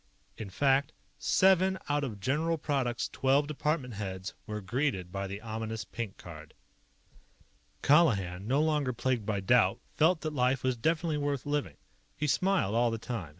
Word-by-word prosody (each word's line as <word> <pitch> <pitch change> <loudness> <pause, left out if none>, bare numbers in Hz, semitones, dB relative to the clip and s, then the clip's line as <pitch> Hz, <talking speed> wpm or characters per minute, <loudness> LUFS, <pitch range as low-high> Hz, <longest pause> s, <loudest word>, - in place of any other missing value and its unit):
In 110 -3 -7
fact, 140 +7 +2 0.3
seven 190 0 +3
out 145 0 0
of 110 -7 -4
General 155 +9 0
Product's 135 -5 -1
twelve 135 +2 +2
department 150 -3 -2
heads 95 -2 -5
were 105 0 -4
greeted 105 -4 -2
by 100 +1 -3
the 100 +1 -6
ominous 110 0 -4
pink 110 -4 -6
card. 80 -3 -11 1.3
Colihan, 100 - +3
no 140 +5 +2
longer 150 -5 +1
plagued 120 -3 -1
by 100 -3 -1
doubt, 105 0 +3 0.2
felt 160 +2 +3
that 155 -1 -3
life 130 -1 +1
was 130 -1 +1
definitely 160 +4 0
worth 145 -2 -2
living. 145 0 -2 0.4
He 150 - -1
smiled 185 - +1
all 120 +1 +3
the 115 - -2
time. 110 -8 -5
130 Hz, 155 wpm, -30 LUFS, 105-150 Hz, 1.3 s, seven